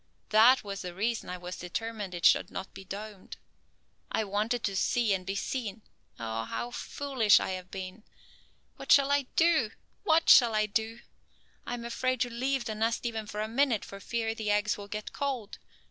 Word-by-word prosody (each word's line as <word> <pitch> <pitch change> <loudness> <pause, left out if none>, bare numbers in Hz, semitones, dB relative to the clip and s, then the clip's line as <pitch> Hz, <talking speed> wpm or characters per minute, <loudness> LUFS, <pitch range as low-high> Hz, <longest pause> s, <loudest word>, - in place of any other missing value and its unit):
That 230 +5 +6
was 200 -1 -5
the 180 -1 -6
reason 225 +4 -1
I 180 - -4
was 180 0 -7
determined 205 +1 -4
it 170 - -3
should - - +5
not 190 - -7
be 195 - -10
domed. 205 +1 -8 0.7
I - - +1
wanted 215 +4 -1
to 195 - -1
see 225 +2 +2
and 185 -1 -3
be 195 - -2
seen. 220 -1 -3 0.4
Oh, 115 0 -3
how 240 - -4
foolish 255 -5 +2
I - - -3
have 185 -1 -6
been! 190 +2 -7 0.7
What - - -4
shall 280 0 +6
I 285 -2 +2
do? 320 -9 +4 0.3
What 325 0 +3
shall 235 -4 +7
I 215 0 +3
do? 220 +3 -2 0.7
I 245 - -2
am 235 -1 -7
afraid 255 +2 -1
to 245 - 0
leave 260 +1 -1
the 220 - -2
nest 225 +2 -1
even 220 -2 -3
for 210 0 -4
a 215 - -1
minute 240 -1 +1
for 195 - -9
fear 225 +2 -2
the 220 -2 -4
eggs 210 0 +2
will 200 -1 -9
get 210 +1 -6
cold. 260 -7 -3
220 Hz, 190 wpm, -29 LUFS, 200-240 Hz, 0.7 s, shall